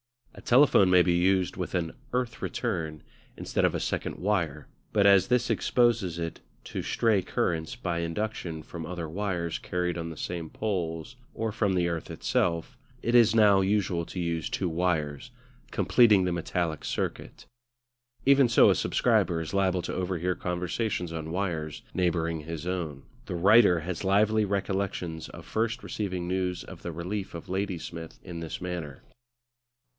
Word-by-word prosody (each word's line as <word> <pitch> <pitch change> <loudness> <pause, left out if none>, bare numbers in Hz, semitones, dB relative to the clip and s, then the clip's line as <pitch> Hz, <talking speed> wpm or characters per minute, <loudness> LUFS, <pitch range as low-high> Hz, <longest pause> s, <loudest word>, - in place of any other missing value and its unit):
A - - -12
telephone 125 -7 +5
may 90 -1 +6
be 90 - +2
used 90 +1 +2
with - - -3
an 85 -2 -1 0.2
"earth 125 -2 -1
return" 85 -10 -3 0.3
instead - - -1
of - - +1
a - - -1
second - - -2
wire; 85 -8 -1 0.3
but 100 -2 +4
as 100 0 +6
this 125 -1 +2
exposes 115 -8 +2
it 85 -1 -4 0.2
to - - -4
stray 110 -4 +2
currents 80 -3 -1
by 85 -2 -2
induction 85 -2 -3
from 85 +1 -7
other 85 0 -5
wires 85 -1 -2
carried 90 -1 -2
on 85 0 -4
the 80 - -8
same 85 -1 -4
poles 90 0 -3 0.2
or 110 -1 -1
from 100 -2 +1
the 90 -1 +2
earth 85 -2 -3
itself, 85 -1 -1 0.3
it 120 - 0
is 115 -2 +6
now 105 -3 +6
usual 95 -3 +1
to 90 - -6
use 85 -2 -1
two 90 - -1
wires, 80 - -1 0.4
completing 110 -6 +4
the 90 - 0
metallic 85 -2 -2
circuit. - - -4 0.8
Even 135 -2 +6
so 120 - +6
a - - +2
subscriber 85 -2 +2
is 80 +2 -5
liable 95 -2 +1
to - - -4
overhear 90 -1 -1
conversations 90 0 -2
on 80 -1 -5
wires 85 -5 -3
neighbouring 85 -3 0
his 80 +1 -6
own; 85 -7 -3 0.2
the 90 - -3
writer 95 -1 +6
has 85 +2 -4
lively 105 +2 +3
recollections 95 -4 -2
of - - -11
first 115 +3 -1
receiving 95 -4 -3
news 90 -1 -1
of - - -11
the 85 - -5
relief 95 +4 -4
of 85 +3 -8
Ladysmith 90 -4 -4
in 85 -2 -7
this 80 -1 -5
manner. 85 -6 -5
90 Hz, 160 wpm, -28 LUFS, 85-100 Hz, 0.8 s, may